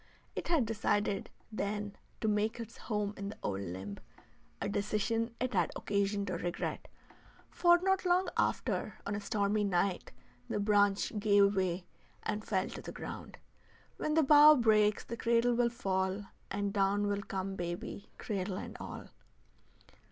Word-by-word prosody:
It -, -, -4 dB
had 325 Hz, -8 st, +3 dB
decided, 205 Hz, -2 st, 0 dB, 0.2 s
then, 205 Hz, -1 st, -3 dB, 0.3 s
to 220 Hz, -, 0 dB
make 215 Hz, +2 st, +1 dB
its 230 Hz, 0 st, -7 dB
home 210 Hz, -2 st, -2 dB
in 200 Hz, 0 st, -4 dB
the 210 Hz, -, -8 dB
old 100 Hz, -1 st, -2 dB
limb; 95 Hz, +2 st, -6 dB, 0.6 s
a -, -, -2 dB
decision 215 Hz, +3 st, -1 dB
it 255 Hz, 0 st, -1 dB
had -, -, +2 dB
occasion 200 Hz, 0 st, 0 dB
to 185 Hz, -, -3 dB
regret, 175 Hz, -1 st, -3 dB, 0.6 s
for 345 Hz, -1 st, +5 dB
not 385 Hz, 0 st, +2 dB
long 365 Hz, +1 st, +3 dB
after, -, -, 0 dB
on 200 Hz, -, -2 dB
a 205 Hz, -, -2 dB
stormy 210 Hz, 0 st, 0 dB
night, 190 Hz, -1 st, 0 dB, 0.4 s
the -, -, -1 dB
branch 205 Hz, -1 st, +3 dB
gave 200 Hz, -1 st, +4 dB
way 185 Hz, -1 st, 0 dB, 0.4 s
and 215 Hz, 0 st, -2 dB
fell 190 Hz, -3 st, 0 dB
to -, -, -7 dB
the -, -, -7 dB
ground. -, -, -8 dB, 0.6 s
"When 305 Hz, -, -1 dB
the 320 Hz, -, +5 dB
bough 300 Hz, +2 st, +9 dB
breaks 215 Hz, -4 st, +3 dB
the 235 Hz, -, -6 dB
cradle 235 Hz, +1 st, +3 dB
will 235 Hz, 0 st, +3 dB
fall, 190 Hz, -3 st, -1 dB, 0.2 s
and 200 Hz, 0 st, -2 dB
down 200 Hz, 0 st, +2 dB
will 200 Hz, 0 st, 0 dB
come 195 Hz, 0 st, -4 dB
baby, 175 Hz, +2 st, -5 dB
cradle 195 Hz, -2 st, -3 dB
and -, -, -7 dB
all." -, -, -7 dB
205 Hz, 155 wpm, -33 LUFS, 195-230 Hz, 0.6 s, bough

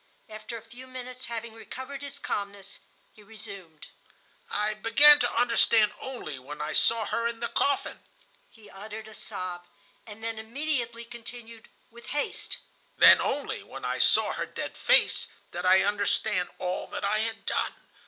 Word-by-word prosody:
After 215 Hz, +1 st, -7 dB
a 225 Hz, -, -11 dB
few 245 Hz, +3 st, -12 dB
minutes, 255 Hz, 0 st, -6 dB
having 230 Hz, -1 st, -5 dB
recovered 260 Hz, +4 st, -8 dB
his 280 Hz, 0 st, -6 dB
calmness, 200 Hz, -7 st, -5 dB, 0.3 s
he 215 Hz, -, -17 dB
resumed: 200 Hz, -6 st, -11 dB, 0.6 s
"I 210 Hz, +1 st, 0 dB
began 280 Hz, +8 st, +7 dB
to -, -, +1 dB
understand 230 Hz, -2 st, +4 dB
only 235 Hz, -, -6 dB
when 145 Hz, +4 st, -9 dB
I 150 Hz, +1 st, -3 dB
saw 230 Hz, -1 st, +3 dB
her 230 Hz, +3 st, 0 dB
in 235 Hz, -1 st, -4 dB
the 235 Hz, -, -1 dB
coffin."... 280 Hz, -1 st, 0 dB, 0.5 s
He 220 Hz, -2 st, -17 dB
uttered 215 Hz, +3 st, -9 dB
a 220 Hz, -, -12 dB
sob, 175 Hz, -3 st, -6 dB, 0.4 s
and 220 Hz, +1 st, -11 dB
then 225 Hz, -1 st, -2 dB
immediately 235 Hz, -1 st, -2 dB
continued, 230 Hz, -1 st, -10 dB, 0.2 s
with 235 Hz, +1 st, -14 dB
haste: 290 Hz, -, -2 dB, 0.4 s
"Then -, -, +8 dB
only, -, -, -2 dB
when -, -, -9 dB
I -, -, -1 dB
saw -, -, +4 dB
her -, -, -3 dB
dead -, -, -6 dB
face, -, -, +3 dB, 0.2 s
did 175 Hz, +1 st, -4 dB
I 185 Hz, +1 st, +7 dB
understand 205 Hz, -2 st, 0 dB
all 180 Hz, 0 st, -3 dB
that -, -, -4 dB
I 210 Hz, +2 st, +1 dB
had 225 Hz, 0 st, -2 dB
done. -, -, -1 dB
225 Hz, 160 wpm, -28 LUFS, 205-235 Hz, 0.6 s, Then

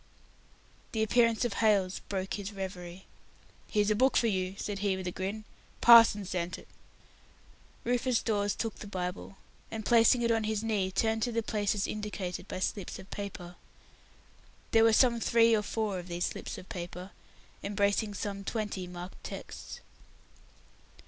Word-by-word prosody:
The 220 Hz, -1 st, +1 dB
appearance 230 Hz, +1 st, +3 dB
of 240 Hz, -, -1 dB
Hailes 200 Hz, -4 st, +2 dB
broke 190 Hz, -1 st, -2 dB
his 205 Hz, 0 st, -4 dB
reverie. 185 Hz, -2 st, -7 dB, 0.6 s
"Here's 210 Hz, -1 st, +1 dB
a -, -, +3 dB
book 260 Hz, +4 st, +3 dB
for -, -, +3 dB
you," 190 Hz, -3 st, 0 dB
said 205 Hz, -1 st, -4 dB
he, 200 Hz, -2 st, 0 dB
with 190 Hz, -, -6 dB
a 180 Hz, -, -2 dB
grin. 195 Hz, +4 st, -4 dB, 0.4 s
"Parson 230 Hz, -4 st, +8 dB
sent 180 Hz, -1 st, -3 dB
it." -, -, -15 dB, 1.2 s
Rufus 245 Hz, 0 st, +1 dB
Dawes 205 Hz, -2 st, 0 dB
took 225 Hz, -2 st, -3 dB
the 210 Hz, -, -9 dB
Bible, 185 Hz, 0 st, -5 dB, 0.3 s
and, 220 Hz, -2 st, -6 dB
placing 235 Hz, +1 st, +5 dB
it 235 Hz, -, +2 dB
on 225 Hz, -1 st, +1 dB
his 215 Hz, 0 st, -1 dB
knees, 200 Hz, -4 st, 0 dB
turned 225 Hz, +1 st, +1 dB
to 240 Hz, -, 0 dB
the 230 Hz, 0 st, -1 dB
places 205 Hz, -1 st, 0 dB
indicated 205 Hz, -4 st, -4 dB
by 185 Hz, -, -5 dB
slips 195 Hz, 0 st, -3 dB
of 190 Hz, -, -13 dB
paper, 180 Hz, -3 st, -7 dB, 1.2 s
embracing 230 Hz, +1 st, +5 dB, 2.9 s
some 200 Hz, 0 st, -4 dB
twenty 205 Hz, -4 st, -3 dB
marked 180 Hz, +1 st, -9 dB
texts. -, -, -8 dB
205 Hz, 130 wpm, -30 LUFS, 190-225 Hz, 2.9 s, Parson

